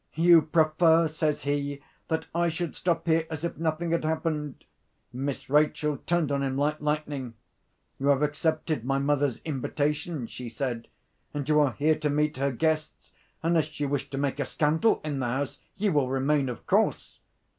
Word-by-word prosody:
'You 170 Hz, 0 st, +7 dB
prefer,' 160 Hz, +1 st, +4 dB
says 155 Hz, -2 st, -1 dB
he, 145 Hz, 0 st, -1 dB, 0.3 s
'that 160 Hz, -1 st, -1 dB
I 170 Hz, 0 st, +2 dB
should 165 Hz, 0 st, -3 dB
stop 175 Hz, -2 st, 0 dB
here 160 Hz, -1 st, +2 dB
as 160 Hz, -1 st, -5 dB
if 170 Hz, -, -3 dB
nothing 165 Hz, +1 st, -1 dB
had 170 Hz, -, +1 dB
happened?' 155 Hz, -3 st, -2 dB, 0.5 s
Miss 135 Hz, +2 st, -4 dB
Rachel 150 Hz, +1 st, +2 dB
turned 170 Hz, -4 st, +1 dB
on 140 Hz, 0 st, +1 dB
him 135 Hz, -1 st, -1 dB
like 150 Hz, +2 st, 0 dB
lightning. 150 Hz, -5 st, -2 dB, 0.6 s
'You 135 Hz, -, -1 dB
have 140 Hz, 0 st, +4 dB
accepted 155 Hz, -2 st, 0 dB
my 135 Hz, +2 st, 0 dB
mother's 140 Hz, -2 st, +1 dB
invitation,' 150 Hz, 0 st, -2 dB
she 120 Hz, +1 st, -7 dB
said; 120 Hz, -1 st, -3 dB, 0.5 s
'and 145 Hz, -2 st, -3 dB
you 150 Hz, 0 st, +4 dB
are 145 Hz, -4 st, +3 dB
here 155 Hz, +4 st, +2 dB
to 150 Hz, -1 st, 0 dB
meet 150 Hz, 0 st, +1 dB
her 140 Hz, +1 st, +1 dB
guests. 155 Hz, +3 st, -2 dB, 0.3 s
Unless 160 Hz, -2 st, +1 dB
you 145 Hz, -, 0 dB
wish 140 Hz, -1 st, -2 dB
to 135 Hz, -, -5 dB
make 140 Hz, 0 st, -1 dB
a 140 Hz, -, 0 dB
scandal 160 Hz, -, +2 dB
in 145 Hz, -3 st, -3 dB
the 125 Hz, -, -1 dB
house, 135 Hz, +3 st, -2 dB, 0.2 s
you 205 Hz, 0 st, +1 dB
will 145 Hz, -4 st, +2 dB
remain, 135 Hz, +1 st, +1 dB
of 120 Hz, -, -7 dB
course! -, -, +1 dB
150 Hz, 175 wpm, -27 LUFS, 140-160 Hz, 0.6 s, You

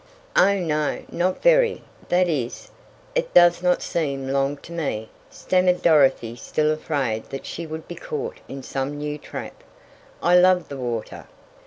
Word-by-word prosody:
"Oh, 200 Hz, 0 st, +5 dB
no, 155 Hz, -5 st, -1 dB
not 185 Hz, +2 st, -1 dB
very -, -, +4 dB, 0.3 s
that 180 Hz, +1 st, +3 dB
is, 135 Hz, -8 st, -3 dB, 0.4 s
it -, -, -2 dB
does 175 Hz, 0 st, +6 dB
not 180 Hz, 0 st, +2 dB
seem 140 Hz, -5 st, -2 dB
long 135 Hz, +1 st, 0 dB
to -, -, -12 dB
me," 140 Hz, -10 st, -3 dB, 0.2 s
stammered 180 Hz, -1 st, +1 dB
Dorothy 135 Hz, -7 st, +4 dB
still 150 Hz, +6 st, 0 dB
afraid 140 Hz, -8 st, -2 dB
that 135 Hz, -, -7 dB
she 170 Hz, 0 st, -6 dB
would 160 Hz, 0 st, -7 dB
be -, -, -6 dB
caught 475 Hz, -1 st, -5 dB
in 135 Hz, -1 st, -8 dB
some 135 Hz, +3 st, -3 dB
new 150 Hz, 0 st, -4 dB
trap. -, -, -8 dB, 0.6 s
"I 175 Hz, +1 st, +5 dB
love 180 Hz, -1 st, +4 dB
the 140 Hz, -, -6 dB
water." 120 Hz, -4 st, -5 dB
155 Hz, 155 wpm, -23 LUFS, 135-180 Hz, 0.6 s, does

